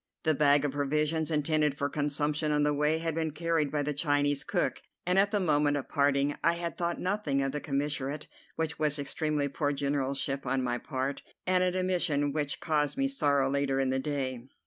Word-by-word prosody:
The 160 -2 +3
bag 145 0 +4
of 145 - 0
provisions 150 +3 0
intended 150 -2 +1
for 140 - 0
consumption 150 +1 -1
on 150 0 +2
the 150 0 +2
way 150 +2 +2
had 165 0 -2
been 160 0 -1
carried 160 -1 0
by 150 -1 0
the 150 +1 -1
Chinese 145 -1 +1
cook, 175 +1 -1 0.2
and 180 +2 +3
at 200 +1 +4
the 205 0 +1
moment 150 -4 +2
of 140 - -5
parting 140 0 +2
I 170 - +4
had 170 0 -4
thought 170 0 -2
nothing 180 -8 0
of 135 - -1
the 150 +1 -4
commissariat, 145 0 -2 0.3
which 160 -1 -3
was 150 -1 +1
extremely 145 +1 -1
poor 145 +1 -1
generalship 140 0 -1
on 130 +1 +1
my 120 -1 -1
part, 135 +1 -3 0.2
and 185 0 +3
an 180 0 0
omission 170 -6 +1
which 145 -2 -1
caused 150 - 0
me 275 0 +2
sorrow 145 - +2
later 135 0 0
in 135 -1 +1
the 130 - 0
day. 130 -3 -2
150 Hz, 200 wpm, -29 LUFS, 140-160 Hz, 0.3 s, bag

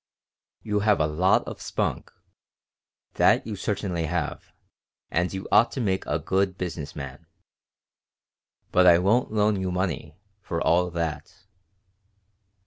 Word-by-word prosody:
"You 105 -1 0
have 105 -1 +3
a 75 - +3
lot 85 +5 +2
of - - -7
spunk. - - -3 1.1
That - - +4
you 110 - -4
certainly 95 -4 -2
have, 85 -1 -3 0.6
and 85 +2 0
you 95 0 -5
ought 120 - +5
to - - -4
make 95 -6 -1
a - - 0
good 95 0 0
business 80 -5 -5
man, 70 +3 -8 1.4
but 90 0 +5
I 85 -1 +8
won't 105 +8 +2
loan 105 -2 +1
you 95 -1 -2
money, 90 -3 -3 0.2
for 85 -4 -3
all 90 +2 +2
that." 85 +1 -5
90 Hz, 135 wpm, -25 LUFS, 85-100 Hz, 1.4 s, I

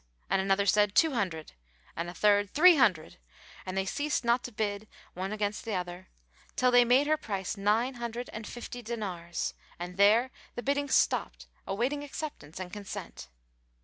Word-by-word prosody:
And 195 - +3
another 195 +1 +2
said, 205 +1 +3
"Two 320 -1 +5
hundred," 180 -9 -2 0.4
and 170 +1 -3
a - - -7
third, 205 +1 +3
"Three 350 +3 +8
hundred"; 185 - +2 0.5
and 185 +1 -3
they 190 - +1
ceased 290 +4 -1
not 240 +1 +2
to 245 - -6
bid, 210 -1 -3 0.3
one 190 +2 -4
against 210 0 -3
other, 180 -2 -4 0.5
till 250 0 +3
they 245 0 +7
made 250 +4 +4
her 310 +1 +2
price 195 - -4
nine 215 +6 +1
hundred 240 0 -5
and 215 0 -6
fifty 245 0 -7
dinars, 190 -8 -4 0.2
and 180 +1 -7
there 220 +6 +5 0.2
the 240 - -5
biddings 285 0 +1
stopped - - +1 0.2
awaiting 250 +9 -1
acceptance 285 - -7
and 185 -1 -7
consent. 200 - -7
210 Hz, 165 wpm, -29 LUFS, 190-245 Hz, 0.5 s, Three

